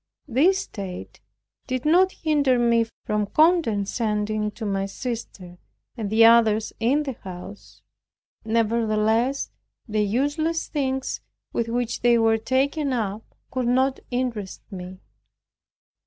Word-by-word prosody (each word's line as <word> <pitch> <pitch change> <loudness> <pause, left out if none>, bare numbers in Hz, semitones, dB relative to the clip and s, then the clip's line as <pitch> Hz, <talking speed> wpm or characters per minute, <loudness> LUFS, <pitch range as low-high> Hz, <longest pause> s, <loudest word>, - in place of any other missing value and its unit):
This 315 +10 +3
state 190 -4 -8 0.5
did 255 0 -3
not 365 +5 +5
hinder 290 -7 +1
me 235 -1 +3 0.2
from 210 -1 0
condescending 215 - +1
to 220 - -6
my 195 -1 -1
sister, 195 -6 -6 0.4
and 220 -5 -4
the 225 +2 +6
others 225 -2 +4
in 265 +7 +2
the 270 -3 -4
house. 190 +2 -10 0.6
Nevertheless, 225 +2 +1 0.4
the 215 -1 0
useless 290 +10 0
things 265 -3 -2 0.3
with 235 - -1
which 240 0 -2
they 240 0 +5
were 225 -1 +3
taken 275 +5 0
up 215 -2 -4 0.2
could 255 -2 -1
not 260 +2 +2
interest 245 -6 -3
me. 185 0 -8
230 Hz, 115 wpm, -24 LUFS, 210-265 Hz, 0.6 s, the